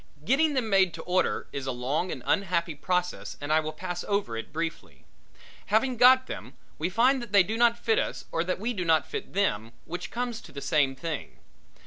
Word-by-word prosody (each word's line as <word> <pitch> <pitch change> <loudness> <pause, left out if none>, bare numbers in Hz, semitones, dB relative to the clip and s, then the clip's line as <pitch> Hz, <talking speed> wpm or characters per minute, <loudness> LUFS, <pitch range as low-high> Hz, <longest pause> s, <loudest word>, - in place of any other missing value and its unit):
Getting 290 +4 +3
them 250 -4 0
made 195 -4 +3
to - - -8
order 180 +1 0
is 140 -1 -5
a - - 0
long 135 +9 -1
and - - -6
unhappy 170 -4 +1
process 180 +3 -2
and 145 +1 -1
I 155 - +5
will 155 0 -3
pass 175 +2 -5
over 200 - -1
it 115 - -6
briefly. 165 +1 -5 0.6
Having 240 +4 +2
got 255 +2 +7
them, - - -8 0.2
we 165 +4 0
find 245 +7 +3
that 235 -4 -8
they 200 -2 +6
do 215 +5 -3
not 235 0 +4
fit 230 -1 +1
us - - -3
or 165 - 0
that 185 +1 -2
we 235 +4 -1
do 185 -5 -2
not 160 -2 +3
fit - - -6
them, 115 - 0
which 175 +2 -5
comes 240 -1 -3
to - - -14
the 140 - -7
same 140 -2 +1
thing. 140 - -5
180 Hz, 210 wpm, -27 LUFS, 155-230 Hz, 0.6 s, got